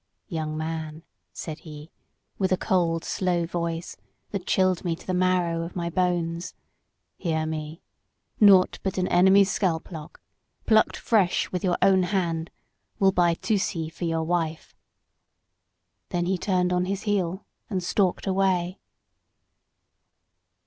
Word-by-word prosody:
"'Young 155 -4 -3
man,' 160 0 -4 0.3
said 155 -1 -7
he, 150 0 -11 0.5
with 190 -1 +1
a 185 - +3
cold, 170 -5 +1
slow 175 -2 0
voice 170 0 -3 0.4
that 195 -3 -4
chilled 185 -2 +2
me 170 -3 -1
to - - -16
the 185 - -2
marrow 180 -2 +1
of 170 +1 -6
my 170 -1 -2
bones, 175 -1 -1 0.6
'hear 160 -3 -1
me. 155 +1 -5 0.6
Naught 195 -3 +6
but 190 - -3
an 185 0 +1
enemy's 190 +2 +5
scalp 180 -3 -1
lock, 155 -3 -9 0.5
plucked 220 -1 +3
fresh 200 -6 +1
with 180 - -3
your 180 -2 +1
own 190 -1 +5
hand, 175 -3 -1 0.5
will 195 -1 +4
buy 175 -2 +3
Tusee 190 -5 -1
for 170 - -5
your 165 -1 0
wife,' 165 -1 -2 1.3
Then 175 -1 -1
he 190 +2 +1
turned 180 -1 0
on 180 0 +1
his 195 +2 -3
heel 190 -3 -1 0.2
and 190 -4 -2
stalked 185 0 +1
away." 190 -2 +1
175 Hz, 135 wpm, -25 LUFS, 165-190 Hz, 1.3 s, Naught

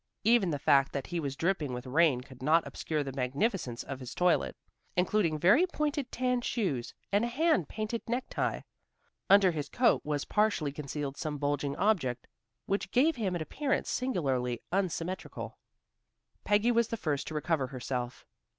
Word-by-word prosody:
Even 225 -4 +4
the 150 - -1
fact 140 -1 +3
that 140 -2 -3
he 175 -1 -3
was 140 -4 -3
dripping 160 -5 0
with 125 +1 -5
rain 140 -1 +3
could 130 0 -14
not 160 +4 +3
obscure 155 -2 -2
the 135 - -5
magnificence 135 - -1
of 135 -1 -6
his 130 -1 -8
toilet, 180 -1 +2 0.4
including 180 -3 +2
very 210 - +5
pointed 295 -5 -2
tan 250 0 0
shoes, 175 - -2 0.2
and 205 +2 +3
a - - +1
hand 290 - +2
painted 215 +1 -3
necktie. 245 +2 -1 0.7
Under 195 -2 +7
his 150 -3 -4
coat 245 -2 +3
was 150 -1 -2
partially 210 -9 +1
concealed 145 -1 -5
some 150 -1 -3
bulging 145 0 -1
object 155 - +1 0.4
which 195 0 -1
gave 285 +6 +3
him 195 -6 -1
an 165 - -2
appearance 275 - -1
singularly 135 - 0
unsymmetrical. 185 -1 -3 0.8
Peggy 210 +3 +3
was 235 -1 +3
the 230 - -3
first 150 -8 -2
to 155 - -5
recover 150 -3 0
herself. 125 -1 -4
165 Hz, 160 wpm, -30 LUFS, 140-215 Hz, 0.8 s, Under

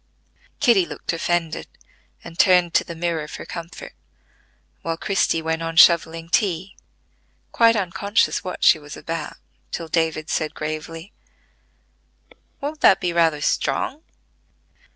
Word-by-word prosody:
Kitty 225 -6 +4
looked - - -5
offended, 165 -1 -2 0.6
and 165 - -12
turned 180 -3 +4
to - - +3
the 170 - -8
mirror 165 -2 -2
for - - -8
comfort; 170 0 -8 0.9
while 165 0 -3
Christie 180 -4 0
went 160 0 -2
on 165 0 -4
shovelling 165 -1 +5
tea, 185 -1 0 0.8
quite 230 -1 +4
unconscious 200 +1 0
what 180 - -6
she - - +6
was 145 -1 -10
about 165 -2 -5 0.3
till 165 - -4
David 160 -1 -1
said 155 -2 -2
gravely: 160 +4 -6 1.5
"Won't 295 +2 -5
that 195 - +6
be 175 -2 -2
rather 165 -3 +2
strong?" 145 - -1
165 Hz, 125 wpm, -22 LUFS, 160-185 Hz, 1.5 s, she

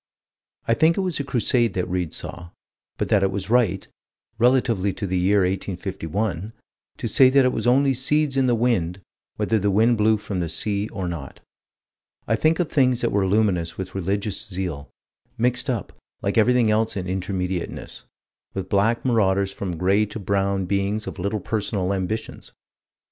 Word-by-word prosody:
I 115 - +4
think 160 +7 +3
it - - +1
was 180 -5 -2
a - - -1
Crusade 120 -4 +1
that 90 - -1
Read 90 -3 -2
saw 85 -1 -6 0.5
but - - -2
that 105 - +4
it 95 - +2
was 95 +1 -4
right, 110 -7 +2 0.5
relatively 115 -6 +2
to 100 - -4
the 95 -1 -1
year 100 +3 +3
1851, 95 +1 -3 0.4
to - - -3
say 130 -1 +6
that 135 0 +4
it 125 - +2
was - - -2
only 135 +2 +4
seeds 140 +2 +1
in 135 -1 +2
the 120 - +3
wind, 100 -7 0 0.3
whether 110 - +1
the 100 +1 +1
wind 110 +3 +3
blew 110 +1 +4
from 100 -2 -4
the 85 -2 -2
sea 100 +5 -1
or 95 -3 -4
not. 80 -6 -6 0.9
I 115 - +2
think 160 +7 +2
of 175 - +1
things 130 -3 +3
that 120 - 0
were 100 -1 +1
luminous 95 -5 +1
with 95 -1 -6
religious 100 +2 -2
zeal, 90 -6 -4 0.5
mixed 125 +3 +1
up, 120 -5 -3 0.3
like 100 - 0
everything 120 0 +4
else 110 0 +1
in 90 - -3
Intermediateness, 95 -1 -4 0.5
with 95 -1 -4
black 110 +5 +1
marauders 100 -5 +2
and - - -14
from 90 -4 -3
gray 100 +5 +2
to 105 - -7
brown 100 -1 0
beings 100 +3 -1
of - - -7
little 100 +4 -1
personal 100 -2 -2
ambitions. 100 +4 -4
100 Hz, 175 wpm, -23 LUFS, 95-120 Hz, 0.9 s, say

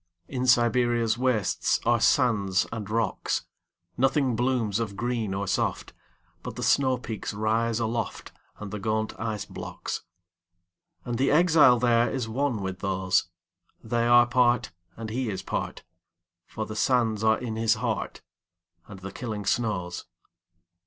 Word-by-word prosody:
In 130 0 -3
Siberia's 120 -2 +3
wastesAre 120 -1 +1
sands 100 -10 +3
and 110 -3 -5
rocks. 115 +1 -1 0.5
Nothing 135 -1 +2
blooms 120 -3 0
of 100 -4 -4
green 115 -2 -2
or 100 +1 -2
soft, - - -1 0.5
But - - -7
the - - -5
snowpeaks 125 -6 0
rise 110 +2 0
aloftAnd 115 0 -3 0.4
the 105 - -4
gaunt 110 +2 -1
ice 110 -2 -3
blocks. - - -6 1.0
And 120 -1 -3
the 135 - +3
exile 155 -6 +5
thereIs 120 0 +2
one 120 -2 -1
with 95 0 -4
those; 95 -2 0 0.6
They 115 +1 0
are 120 0 +7
part, 120 -1 +2 0.3
and 110 -1 -6
he 125 0 -2
is 95 -2 -4
part, - - -4 0.6
For 110 - -5
the 110 - -7
sands 110 -2 +1
are 110 0 +4
in 115 -3 -5
his 115 0 +2
heart, 110 -2 -3 0.6
And 100 -2 -11
the 100 +1 -7
killing 110 -5 -5
snows. 95 -6 -1
115 Hz, 130 wpm, -26 LUFS, 110-125 Hz, 1.0 s, are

